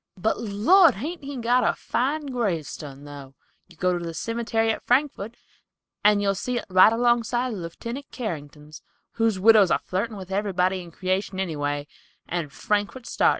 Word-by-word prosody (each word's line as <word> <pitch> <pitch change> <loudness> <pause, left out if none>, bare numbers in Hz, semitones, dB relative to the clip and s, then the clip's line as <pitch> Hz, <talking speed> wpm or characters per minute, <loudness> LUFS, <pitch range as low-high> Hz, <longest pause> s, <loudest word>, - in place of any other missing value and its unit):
But, 200 +5 0
Lord, 240 - +5
hain't 305 - -5
he 280 0 -6
got 245 +1 +2
a - - +2
fine 290 +5 -1
gravestun, 160 - -3
though! 140 -2 -10 0.3
You - - -18
go 180 -1 +1
to 175 - -4
the 165 -1 -5
cimetery 230 +1 0
at - - -4
Frankford, 245 -4 0 0.7
and 205 0 +4
you'll 195 0 +2
see 240 +5 -3
it - - -4
right 185 +3 +7
along 240 +1 +3
side 240 +2 -2
of 205 - -5
Leftenant 235 +11 -7
Carrington's, 150 - -7 0.3
whose 225 -3 +1
widow's 210 -2 +6
a - - +3
flirtin' 205 +4 -3
with 190 -1 -9
everybody 190 -2 0
in 175 - -11
creation 185 +2 -2
anyway, 145 -5 -2 0.4
and 165 -4 -3
Frankford 205 - -2
sartin." - - +2
205 Hz, 170 wpm, -25 LUFS, 175-235 Hz, 0.7 s, right